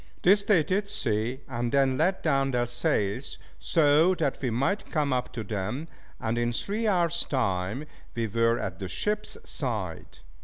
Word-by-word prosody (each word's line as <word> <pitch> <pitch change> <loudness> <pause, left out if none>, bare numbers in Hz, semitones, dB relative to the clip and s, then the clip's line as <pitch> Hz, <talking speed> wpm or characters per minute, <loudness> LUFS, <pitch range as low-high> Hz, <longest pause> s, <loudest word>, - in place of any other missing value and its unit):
This 200 +3 +5
they 195 -6 +4
did 200 +5 -1
see, 115 - -1
and 120 -2 -2
then 135 -2 +3
let 180 +7 +1
down 135 -3 +2
their 120 -2 +1
sails 120 0 -1 0.2
so 160 +3 +4
that 150 -6 -1
we 130 - 0
might 135 - 0
come 145 -3 +1
up 125 -1 -1
to 115 - -4
them, 105 +9 -3 0.3
and 115 0 -1
in 120 0 +1
three 215 - -1
hours 170 -4 +2
time 110 0 -1 0.3
we 115 -1 0
were 115 +2 +2
at 85 -3 -4
the 95 - -4
ship's 210 - -1
side. - - -4
130 Hz, 165 wpm, -27 LUFS, 115-170 Hz, 0.3 s, This